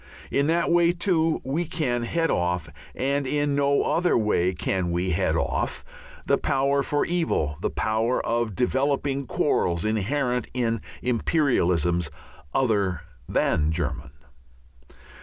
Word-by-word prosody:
In 140 +1 +2
that 170 +2 +1
way, 170 0 +4
too, 170 -3 +1
we 150 +7 -1
can 150 -7 -1
head 165 +8 0
off 90 -1 0 0.3
and 140 +1 0
in 145 +1 0
no 140 0 +2
other 175 +1 +2
way 105 -5 +2
can 90 0 -2
we 90 +2 -1
head 85 - +1
off - - -2 0.4
the - - +2
power 140 0 +1
for 145 +1 0
evil, 160 - 0
the - - 0
power 110 +3 0
of 115 -3 -1
developing 135 +2 0
quarrels 85 - 0
inherent 125 +3 0
in 115 -3 0 0.2
"imperialisms" 90 - +1 0.4
other 100 - +1 0.3
than 75 0 +1
German. 75 -3 -3
125 Hz, 125 wpm, -25 LUFS, 90-145 Hz, 0.4 s, way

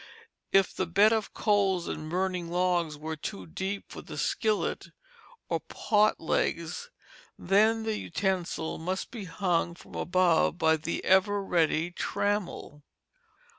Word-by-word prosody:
If 195 -1 +4
the 185 - -2
bed 200 +6 +5
of 220 -2 -1
coals 195 -4 +1
and 155 0 -5
burning 180 -1 -1
logs 175 -3 +1
were 160 +2 -5
too 95 -10 -6
deep 190 - -4
for - - -7
the - - -9
skillet 215 -2 0 0.6
or - - 0
pot 215 -1 +1
legs, 165 - -1 0.5
then 220 +3 +3
the 220 -1 -1
utensil 185 -4 -2
must 185 +4 -3
be 225 -5 -6
hung 175 -1 0
from - - -16
above 175 -2 +2
by 160 -2 +3
the 160 +2 -4
ever 200 +2 +3
ready 170 -2 +1
trammel. 200 -6 -2
185 Hz, 130 wpm, -29 LUFS, 165-205 Hz, 0.6 s, bed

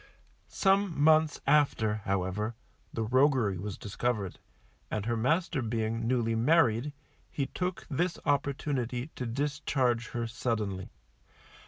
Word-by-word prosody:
Some 195 -5 +2
months 155 0 +4
after, 140 -7 +3
however, 100 +4 -1 0.4
the 115 - -2
roguery 125 - +3
was 100 +1 -5
discovered, 105 -2 -2 0.5
and 105 -1 -2
her 120 0 0
master 150 +5 +1
being 115 0 -1
newly 120 -2 +1
married, 120 +1 +3 0.4
he 140 - -2
took 180 +5 -3
this 170 +4 -1
opportunity 140 -2 -1
to 125 - -4
discharge 130 -2 0
her 120 -1 -3
suddenly. 110 -5 -2
120 Hz, 115 wpm, -30 LUFS, 110-145 Hz, 0.5 s, months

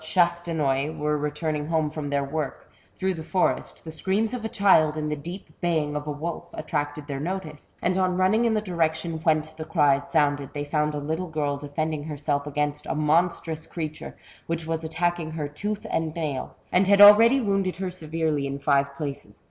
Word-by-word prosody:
Chastenoy 160 -4 +1
were 150 0 0
returning 150 0 -2
home 160 -2 +1
from 150 -2 -4
their 140 0 +1
work, 145 +1 -4 0.3
throngli 190 -1 0
the 160 - -6
forest, 180 +3 -1
the 160 - -7
screams 200 +8 0
of 245 -3 -4
a 225 - -2
child 160 -8 +4
and 150 0 -2
the - - 0
deep 175 +6 -8
baying 160 -4 0
of 150 0 -4
a - - -1
wolf, 160 +4 -5
attracted 145 -1 -3
their 140 -2 -4
notice, 155 -2 -5
and 180 +1 +2
on 185 -1 +1
running 205 +6 +3
in 225 -1 +2
the 215 - +1
direction 165 -3 -1
whence 155 -1 +1
the 155 0 -6
cries 145 -4 +2
sounded, 145 -3 +1
they 145 -1 -3
fonnd 150 0 0
a - - -2
little 160 +5 -3
girl 150 -2 -1
defending 145 +1 -3
herself 145 -1 -2
against 145 0 -1
a - - -1
monstrous 160 +1 +1
creature, 155 -2 -6 0.3
which 165 -1 -2
was 160 0 -2
attacking 170 0 -1
her 155 -2 -3
tooth 205 +9 -4
and 160 -1 -1
nail, 150 -6 -3 0.2
and 185 +1 +3
had 200 0 +5
already 225 +6 +9
wounded 195 -5 0
her 185 -1 -3
severely 155 -4 -1
in 140 0 -4
five 140 -1 +1
places. 140 -1 -6
155 Hz, 190 wpm, -25 LUFS, 150-175 Hz, 0.3 s, already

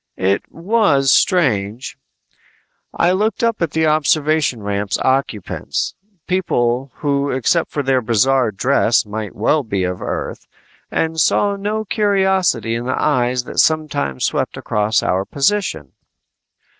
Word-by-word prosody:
It 95 +2 -1
was 165 - +2
strange. 120 - +1 1.0
I 175 - +2
looked 215 +5 0
up 230 -3 0
at 170 - +1
the 160 +2 0
observation 155 -5 +1
ramp's 100 -1 -2
occupants 130 -7 -2 0.3
people 130 -8 0
who 140 -1 -1
except 135 +6 +1
for 145 - -3
their 130 -1 +2
bizarre 125 +2 +2
dress 120 +2 +2
might 105 0 -6
well 130 +9 +2
be 100 -7 -2
of 90 0 -3
Earth - - -5 0.4
and 160 0 -1
saw 200 +4 +2
no 210 +2 -3
curiosity 190 - +1
in 120 +1 -3
the 130 - -1
eyes 125 -3 +1
that - - -5
sometimes 150 - +1
swept - - -2
across 105 +1 0
our 95 +1 0
position. 140 - -1
135 Hz, 130 wpm, -18 LUFS, 110-170 Hz, 1.0 s, was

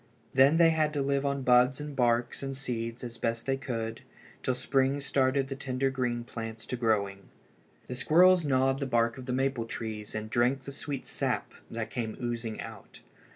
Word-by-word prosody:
Then 135 +4 +6
they 165 -1 +6
had 155 -1 +1
to 145 - 0
live 140 0 +1
on 140 -1 -1
buds 125 +2 +5
and 150 -1 -6
barks 120 -1 +1
and 135 -1 -4
seeds 120 -2 -4
as 115 -1 -7
best 115 0 -1
they 135 - +1
could 115 -4 -4 0.4
till 130 - 0
spring 135 +2 +1
started 135 -1 +1
the 135 - -4
tender 135 0 -1
green 125 -2 -1
plants 115 -2 -7
to - - -3
growing. 100 -5 0 0.6
The - - -6
squirrels 175 +7 +5
gnawed 135 -1 +2
the 140 - -2
bark 115 0 +1
of 130 - -9
the - - -1
maple 130 -2 0
trees 110 -2 -5
and 110 0 -3
drank 125 +4 +1
the 140 - -7
sweet 140 -1 -5
sap - - -2 0.2
that 115 -1 -4
came 115 -3 -3
oozing 120 -3 -3
out. 110 -3 -10
130 Hz, 190 wpm, -29 LUFS, 115-135 Hz, 0.6 s, Then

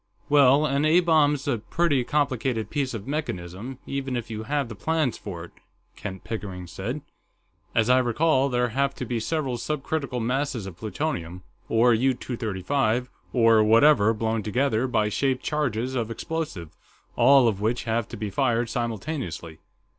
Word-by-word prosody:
"Well, 145 0 +5
an 140 0 +1
A 155 +3 +5
bomb's 150 -5 +2
a 120 - +1
pretty 145 +3 +1
complicated 130 -5 -1
piece 135 -5 -1
of 105 -2 -6
mechanism, 120 - -4
even 135 -2 -3
if 115 -1 -6
you 110 -1 -4
have 140 +3 -1
the 115 - -7
plans 155 +3 0
for 90 -5 -7
it," 85 - -11 0.4
Kent 95 -1 -7
Pickering 95 -5 -5
said. 110 - -5 0.7
"As 115 -1 +3
I 125 +1 +5
recall, 135 +3 +2
there 125 -1 +1
have 135 +3 0
to 125 - -5
be 120 0 -2
several 135 0 -2
subcritical 140 0 -3
masses 125 -1 -1
of 95 -3 -8
plutonium, 95 - -4 0.3
or 115 +2 +4
U 130 +3 +2
235, 120 +1 -1 0.2
or 115 -3 +5
whatever, 110 0 +5
blown 110 0 -1
together 120 +3 0
by 110 -4 +1
shaped 130 +4 0
charges 130 -5 -1
of 120 -4 -1
explosive, 115 - -5 0.4
all 130 +1 +6
of 100 -3 -1
which 115 +3 0
have 115 -1 -1
to 115 - -8
be 105 -1 -4
fired 120 -1 +1
simultaneously. 115 - -4
120 Hz, 160 wpm, -25 LUFS, 110-140 Hz, 0.7 s, all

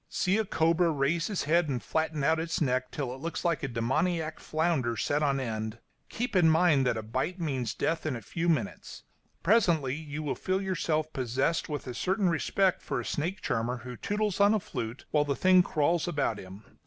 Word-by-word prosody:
See 190 +4 +1
a 220 - +1
cobra 165 0 +2
raise 160 +4 0
its 205 - -1
head 160 +1 +2
and 130 -3 -1
flatten 160 +1 -1
out 160 +3 +3
its 165 0 -2
neck 130 -3 0
till 135 -4 -4
it 130 - -10
looks 170 +3 -4
like 170 -3 +1
a - - -2
demoniac 155 +7 -1
flounder 155 -8 0
set 145 +1 0
on 140 -2 +2
end; 110 -3 -3 0.3
keep 240 -2 -3
in 175 -3 +6
mind 160 -5 +4
that 115 - +1
a 110 - -4
bite 130 - -2
means 130 -9 -2
death 165 0 -1
in 145 - -1
a 115 - -6
few 170 - -2
minutes; 160 - -2 0.4
presently 170 - +3
you 155 0 -5
will 145 - -1
feel 185 0 -1
yourself 160 -5 -1
possessed 130 +6 0
with 145 -2 -4
a 125 - -5
certain 190 - +1
respect 185 +3 +1
for - - -3
a - - -5
snake 170 +6 -2
charmer 120 +2 -1
who 125 -1 -6
tootles 205 - -1
on 205 +2 +5
a - - +2
flute 115 - -6
while 150 -1 +3
the 140 -1 -1
thing 185 +6 +5
crawls 165 +1 +1
about 145 -10 -1
him. 95 +3 -11
155 Hz, 205 wpm, -29 LUFS, 130-175 Hz, 0.4 s, in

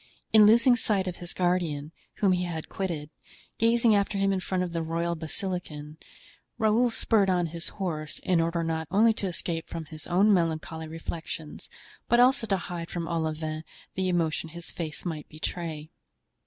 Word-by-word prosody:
In 215 -1 +9
losing 235 +3 +6
sight 205 -5 0
of 180 - -3
his 175 -1 -5
guardian, 170 -5 0 0.2
whom 200 -3 +3
he 180 0 +1
had 165 -3 -5
quitted, 160 -6 -3 0.5
gazing 230 0 +4
after 200 0 +1
him 195 0 +2
in 190 - 0
front 185 0 -1
of 175 -2 -4
the 165 - -1
royal 165 +1 -1
basilican, 160 -2 -5 0.6
Raoul 225 +2 +3
spurred 215 -3 +2
on 180 -2 +2
his 170 0 -5
horse, 160 -6 -4
in 180 -3 +3
order 165 0 0
not 160 -1 -2
only 220 +4 +5
to 200 - -1
escape 170 -2 -3
from 165 -1 -5
his 155 0 -9
own 200 +4 +4
melancholy 160 -2 -1
reflections, 160 -1 -6 0.4
but 240 - +5
also 250 -2 +5
to 195 - +2
hide 170 -1 -5
from 170 -2 -3
Olivain 155 -2 -2 0.3
the 185 0 0
emotion 165 -2 0
his 170 +1 -8
face 160 -1 -5
might 155 -4 -4
betray. 155 -1 -5
175 Hz, 170 wpm, -28 LUFS, 160-195 Hz, 0.6 s, In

